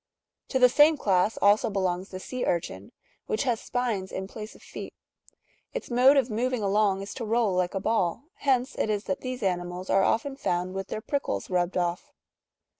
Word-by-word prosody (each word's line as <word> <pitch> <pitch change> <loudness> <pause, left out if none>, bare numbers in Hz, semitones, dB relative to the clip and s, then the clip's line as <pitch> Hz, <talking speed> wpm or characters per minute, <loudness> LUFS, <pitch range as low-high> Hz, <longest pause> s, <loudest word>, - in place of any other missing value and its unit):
To 260 - 0
the 250 -1 +7
same 295 +5 +5
class^^ 195 -2 +2
also 205 +2 +5
belongs 190 -2 -1
the 185 - -7
sea 255 +6 -5
urchin,^ 100 - -2 0.4
which 215 - 0
has 240 -4 0
spines 230 -7 -2
in 190 0 -4
place 215 +2 -9
of - - -17
feet - - -8 0.4
;" - - -41
its - - -5
mode 255 +4 +6
of 260 -3 +2
moving 240 +1 -1
along 200 -1 +2
is 200 - -7
to 245 - -5
roll 225 -2 +1
like 180 +1 0
a - - 0
ball, 190 -1 0
hence 260 -1 +1
it - - +1
is 210 -1 0
that 190 - -3
these 255 -2 -5
animals 180 0 -2
are 195 - +4
often 250 +7 +1
found 180 -6 -1
with 195 0 -4
their 215 - -4
prickles 280 -5 -3
rubbed 180 0 0
off. 180 +11 -2
210 Hz, 195 wpm, -27 LUFS, 185-250 Hz, 0.4 s, the